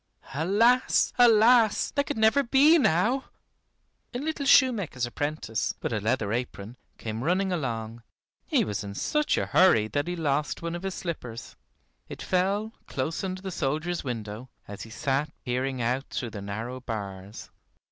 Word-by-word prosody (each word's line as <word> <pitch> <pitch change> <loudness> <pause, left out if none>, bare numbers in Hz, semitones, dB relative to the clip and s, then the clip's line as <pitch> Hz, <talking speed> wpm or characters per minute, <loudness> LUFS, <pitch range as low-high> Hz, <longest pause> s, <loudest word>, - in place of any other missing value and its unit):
Alas, 210 - +3
alas! 230 -1 +5
that 285 0 -1
could - - -3
never 220 +6 +4
be 280 +6 +5
now 240 - +2 0.9
A - - +1
little 290 +1 -3
shoemaker's 205 - +4
apprentice, 135 -3 -3
with - - -2
a 110 - -1
leather 110 -1 0
apron, 120 -2 -4 0.2
came 110 +1 -5
running 185 +5 +1
along. 115 -7 -4 0.5
He - - +2
was 105 -2 -3
in 100 -1 -7
such 300 - 0
a - - 0
hurry 115 -13 +4
that 145 +5 -1
he 175 - -2
lost 150 -1 -1
one 170 0 -3
of 175 - -5
his 195 -1 -4
slippers. 125 -10 -6 0.5
It - - -8
fell 200 +4 0
close 140 +8 -3
under 185 0 -4
the 190 - -4
soldier's 160 +3 -2
window, 115 -1 -6 0.2
as 100 0 -8
he 115 - -8
sat 140 +5 -1
peering 125 0 -2
out 125 +4 0
through 120 -3 -4
the 100 - -7
narrow 110 +6 -5
bars. 100 -4 -7
150 Hz, 155 wpm, -27 LUFS, -, 0.9 s, alas